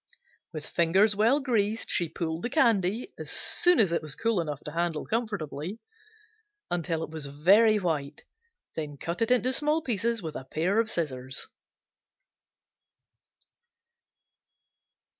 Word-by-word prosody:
With 155 -2 -6
fingers 190 +5 +3
well 230 +7 +3
greased 225 -5 0
she 170 -4 +1
pulled 160 0 -4
the 240 - -2
candy, 230 - +1
as - - -7
soon 355 0 +3
as 195 -6 +4
it 170 - 0
was 155 -3 -4
cool 225 -5 +1
enough 150 -3 -5
to 150 - -6
handle 170 -1 -2
comfortably, 205 -6 -3 0.9
until 165 -2 -1
it - - -7
was 155 -3 -5
very 200 +10 +4
white, 155 -6 -3 0.5
then 150 -2 -5
cut 170 +7 -4
it 230 - +2
into 250 +1 +3
small 300 +3 +2
pieces 230 - -1
with 155 -2 -5
a - - -5
pair 180 +10 0
of 225 -1 +1
scissors. 130 -7 -3
180 Hz, 135 wpm, -28 LUFS, 155-225 Hz, 0.9 s, as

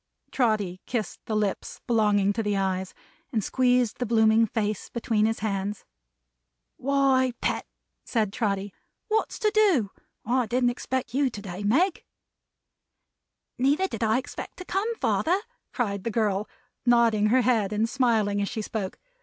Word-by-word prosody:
Trotty 210 -7 0
kissed 230 -4 -3
the 220 - -1
lips 210 -2 -2
belonging 210 -4 +3
to 225 - -1
the 205 -2 0
eyes, 190 -1 -2 0.4
and 220 -5 0
squeezed 250 -2 +2
the 250 - 0
blooming 220 0 +4
face 210 -1 -2
between 225 -3 +1
his 225 -2 -2
hands. 200 -1 -2 0.9
"Why, 270 -2 +2
Pet," - - -1 0.4
said 215 -4 -1
Trotty. 200 -4 -1 0.4
"What's 440 +1 0
to 430 -2 +1
do? 360 - +3 0.3
I 245 +1 +1
didn't 245 +2 +2
expect 255 +1 -3
you, 275 0 +2
to 210 - -8
day, 185 -1 -6
Meg." 315 - +2 1.6
"Neither 285 +9 +2
did 225 - -6
I 220 +1 +3
expect 260 - -6
to 365 - -8
come, 425 +6 -1
father," 365 -3 +1 0.3
cried 200 -6 -2
the - - -1
girl, 210 -2 0 0.3
nodding 235 -3 +4
her 255 +4 +4
head 230 -5 +2
and 215 +2 +1
smiling 225 -5 +1
as 200 - -1
she 220 - -4
spoke. 205 -3 -4
225 Hz, 150 wpm, -26 LUFS, 205-255 Hz, 1.6 s, blooming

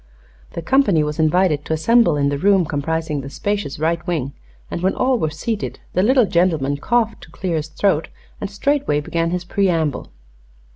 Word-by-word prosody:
The 170 - -5
company 205 - +3
was 150 +1 -4
invited 155 -1 +2
to - - -2
assemble 170 +1 +3
in 140 0 +2
the 140 0 -2
room 195 -1 +3
comprising 155 0 -2
the 135 - -8
spacious 200 0 -3
right 160 +2 0
wing, 145 -6 -2 0.4
and - - -3
when 190 +1 +1
all 255 -1 +1
were 155 - 0
seated 205 +7 -4
the 185 - +2
little 250 +3 +4
gentleman 160 -7 +1
coughed 230 +8 0
to - - -13
clear 170 0 -3
his 155 0 -3
throat 160 0 0 0.3
and 205 - -4
straightway 275 - 0
began 165 +3 -1
his 180 +1 -2
preamble. 170 -6 0
170 Hz, 180 wpm, -20 LUFS, 150-200 Hz, 0.4 s, little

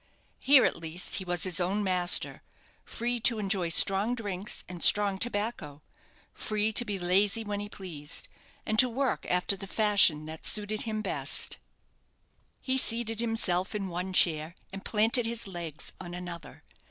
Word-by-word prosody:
Here, 275 -1 +5
at - - 0
least, 165 +2 -1
he 190 - -5
was 175 -1 0
his 180 -4 +3
own 190 +4 -1
master: 180 -2 +1 0.4
free 240 +1 -3
to 230 0 +3
enjoy 195 -4 0
strong 195 +7 +4
drinks 205 -4 -4
and 180 -1 -4
strong 200 -2 +3
tobacco 205 -10 -4 0.5
free 215 0 -1
to 240 - +5
be 205 -4 -3
lazy 195 +5 +1
when 205 -1 -4
he 205 0 -6
pleased, 165 -7 -7 0.4
and 215 0 -1
to 255 - +7
work 265 +2 -2
after 180 +2 0
the 195 0 -8
fashion 200 -8 +3
that 160 0 -9
suited 215 0 +1
him 215 0 -3
best. - - 0 1.0
He 265 0 +2
seated 225 -2 0
himself 215 -5 -1
in 195 -2 -3
one 180 +2 -4
chair, 165 -2 +2 0.2
and 195 - -8
planted 225 +2 +2
his 230 0 -5
legs 170 -5 -7
on 175 0 -8
another. 175 -1 -9
200 Hz, 160 wpm, -28 LUFS, 175-220 Hz, 1.0 s, to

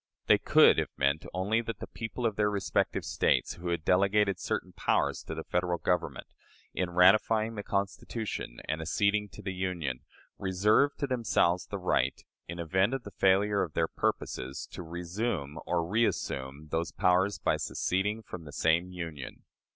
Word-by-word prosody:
They - - +5
could - - +6
have - - -1
meant 70 +3 +1
only 100 +5 0
that 115 -1 -5
the - - -6
people 115 +2 -5
of 110 -3 +1
their 105 0 +2
respective 100 -2 0
States - - +1
who 85 - -8
had 85 -2 -2
delegated 100 +1 +3
certain - - -3
powers - - 0
to 80 - -5
the 80 - -5
Federal 90 0 0
Government, 90 +1 -1 0.5
in 90 -2 -1
ratifying 105 +5 +4
the 105 - -4
Constitution 100 - -3
and 80 +1 -2
acceding 100 +5 +1
to - - -12
the 95 -1 -3
Union, 85 -9 -2 0.4
reserved 105 +9 +2
to - - +2
themselves 110 -9 +1
the 100 - -4
right, 90 -1 0 0.3
in 85 - -6
event 95 +8 +1
of 135 - -5
the 100 - -9
failure 100 +2 +3
of 80 - -3
their - - +1
purposes, 65 +2 -3
to - - -7
"resume" 85 -2 -3
(or 85 -1 +1
"reassume") 75 - -1
those 80 0 -1
powers 90 +4 +2
by - - +1
seceding 105 +4 -1
from 85 -4 -8
the 75 - -9
same 80 +4 +2
Union. 85 -7 -7
90 Hz, 165 wpm, -30 LUFS, 85-105 Hz, 0.5 s, could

